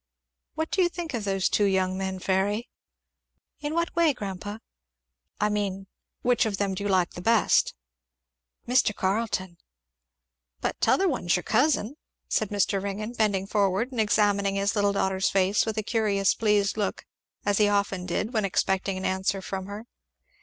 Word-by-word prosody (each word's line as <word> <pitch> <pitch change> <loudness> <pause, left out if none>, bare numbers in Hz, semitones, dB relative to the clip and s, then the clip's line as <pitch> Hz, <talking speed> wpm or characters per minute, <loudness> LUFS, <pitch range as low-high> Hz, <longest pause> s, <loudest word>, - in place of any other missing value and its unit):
"What 315 0 -2
do 385 - +2
you 350 - +3
think 340 -3 -6
of 225 -4 -3
those 195 -1 +1
two 205 - +2
young 190 -1 +1
men, 190 0 -3
Fairy?" 195 +5 0 0.9
"In 300 +1 -3
what 335 0 -1
way, 335 -3 +4
grandpa?" 205 0 -5 0.8
"I 210 - +2
mean, 200 -2 -2 0.4
which 245 0 +3
of 200 -3 -2
them 200 -1 0
do 190 - -5
you 205 - -2
like 185 -2 +2
the 175 - -8
best?" 225 - +3 0.9
"Mr. 245 -4 +3
Carleton." 190 -3 -1 1.0
"But - - -3
t'other 390 - +3
one's 210 - +1
your 180 - -2
cousin," 285 -2 +1 0.3
said 215 - 0
Mr. 200 -1 +1
Ringgan, 205 +3 -4
bending 205 -5 +1
forward 200 +4 +1
and 240 -4 0
examining 205 -2 +2
his 200 +2 0
little 205 -1 +2
granddaughter's 190 -1 +1
face 195 +3 +2
with 220 0 -2
a 215 - 0
curious 205 -3 +1
pleased 210 -2 +1
look, 205 -3 -2 0.4
as 205 0 +2
he 210 - +5
often 200 -3 0
did 205 +7 -2
when 215 -2 +1
expecting 190 0 0
an 185 - -4
answer 190 +1 0
from 190 0 -5
her. 205 +3 -7
200 Hz, 165 wpm, -26 LUFS, 190-220 Hz, 1.0 s, he